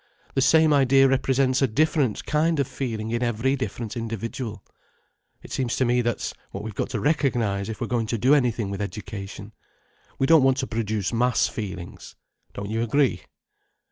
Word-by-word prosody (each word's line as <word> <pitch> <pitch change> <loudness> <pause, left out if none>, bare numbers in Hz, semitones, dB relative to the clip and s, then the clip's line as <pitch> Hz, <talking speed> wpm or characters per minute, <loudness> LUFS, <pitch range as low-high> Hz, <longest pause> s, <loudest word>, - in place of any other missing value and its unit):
The 135 - +1
same 160 +2 +5
idea 135 -1 +5
represents 135 0 +2
a 135 - +4
different 145 -1 +1
kind 155 +1 +1
of 140 - +1
feeling 115 -4 -4
in 120 +1 -1
every 120 +3 +1
different 125 -3 -5
individual. 115 -1 -5 0.8
It - - -12
seems 125 -3 -1
to 130 - +1
me 120 +1 +2
that's 120 -1 -2 0.2
what 95 - -7
we've 110 0 -6
got - - -3
to - - -2
recognize 120 -10 0
if 110 - -6
we're - - -1
going 115 -2 -1
to 115 - -1
do 130 +6 +4
anything 120 -7 +1
with 100 0 -4
education. 100 0 -7 0.6
We 135 - +1
don't 160 +1 +6
want 135 0 +3
to 135 - -1
produce 110 -3 -2
mass 125 +1 +2
feelings. 95 -5 -7 0.4
Don't 100 +1 -5
you 115 +1 -1
agree?" 135 +3 +1
120 Hz, 175 wpm, -24 LUFS, 110-135 Hz, 0.8 s, don't